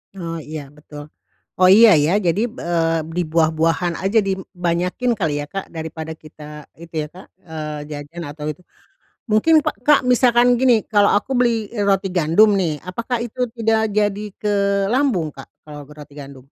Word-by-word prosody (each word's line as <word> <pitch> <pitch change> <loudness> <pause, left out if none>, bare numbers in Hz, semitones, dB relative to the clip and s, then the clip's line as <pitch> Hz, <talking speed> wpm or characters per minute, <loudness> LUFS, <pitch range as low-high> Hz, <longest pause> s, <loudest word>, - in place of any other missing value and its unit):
Oh, 170 -3 -5
iya, 155 0 -7
betul. 150 0 -11 0.5
Oh 185 - +6
iya, 225 +1 +8 0.2
ya. 160 - +1
Jadi, 175 +4 +1
eee, 165 -7 -1 0.2
di 180 - +1
buah-buahan 165 +2 +1
aja 205 +4 +3
di 195 - +1 0.3
banyakin 180 +9 0
kali 160 -6 0
ya, 145 - -4
Kak, 195 - -4
daripada 160 0 -6
kita 155 -1 -15 0.4
itu 170 -1 -13
ya, - - -7
Kak, 185 - -13 0.2
eee, 155 -2 -6
jajan 150 +4 -7
atau 150 +1 -8
itu. 150 - -13 0.7
Mungkin 310 +10 +4
pak 310 - -2
Kak, 295 -1 +6
misalkan 245 0 +4
gini 250 -4 +4
kalau 205 -2 +3
aku 205 +6 -2
beli 230 -4 +1 0.2
roti 195 -1 +1
gandum 175 +5 +4
nih, 160 -6 -1
apakah 235 +6 -3
itu 240 +1 -9 0.2
tidak 220 -1 +1
jadi 205 -1 +1 0.2
ke 210 -1 -1 0.4
lambung, 250 - +1
Kak, 135 - -11 0.2
kalau 145 -1 -9
roti 150 -1 -13
gandum? 140 -3 -11
175 Hz, 165 wpm, -20 LUFS, 155-220 Hz, 0.7 s, iya